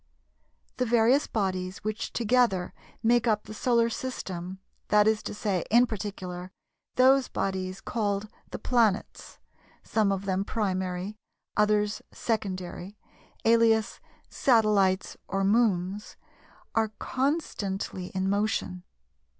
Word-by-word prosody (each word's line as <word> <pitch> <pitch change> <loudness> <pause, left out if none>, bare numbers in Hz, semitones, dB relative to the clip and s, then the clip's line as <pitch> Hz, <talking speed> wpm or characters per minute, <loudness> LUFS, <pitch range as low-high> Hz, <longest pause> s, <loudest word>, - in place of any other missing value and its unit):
The 250 - +1
various 240 +4 +4
bodies 185 -3 -2
which 215 0 -3
together 235 -6 +2 0.3
make 235 +1 +3
up 210 -2 +2
the - - -9
Solar 235 +1 +2
system, 190 -7 -5 0.3
that 210 0 +4
is 220 -1 +2
to - - -5
say, 200 -5 -1
in 240 +2 +6
particular, 190 -5 -6 0.4
those 260 +1 +5
bodies 190 -1 -3
called 205 -2 -1 0.2
the - - -5
"planets"—some 220 -1 -1
of 195 0 -2
them 190 0 0
"primary," 190 -1 -2 0.4
others 210 0 +2
"secondary" 195 -3 -3 0.5
(alias 225 -1 +3 0.3
"Satellites" 210 -6 +2
or 195 0 -1
"Moons")—are 210 +1 -1
constantly 210 - -2
in 190 0 0
motion. 200 -2 -1
210 Hz, 100 wpm, -28 LUFS, 190-230 Hz, 0.5 s, in